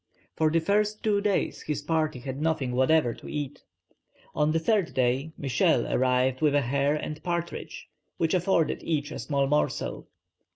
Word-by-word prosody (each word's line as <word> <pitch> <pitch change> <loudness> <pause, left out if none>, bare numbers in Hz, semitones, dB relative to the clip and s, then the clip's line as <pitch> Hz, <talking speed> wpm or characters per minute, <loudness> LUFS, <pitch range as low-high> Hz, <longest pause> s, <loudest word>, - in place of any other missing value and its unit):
For 155 0 +2
the 165 +2 +2
first 210 +5 0
two 205 -2 +2
days 205 -1 0
his 145 -1 -3
party 155 -2 0
had 130 +2 -5
nothing 155 -5 0
whatever 130 0 +3
to - - -11
eat. 145 -1 -4 0.7
On 150 0 +2
the 165 - +2
third 190 +2 +1
day, 130 +4 +1
Michel 130 -3 +2
arrived 130 0 +2
with 150 -2 +3
a 145 - +4
hare 140 +3 +1
and 155 0 -5
partridge, 170 0 -4 0.3
which 165 -1 +1
afforded 180 -3 +1
each 150 -2 -2
a - - -6
small 140 -2 0
morsel. 150 +2 -1
150 Hz, 165 wpm, -27 LUFS, 135-165 Hz, 0.7 s, a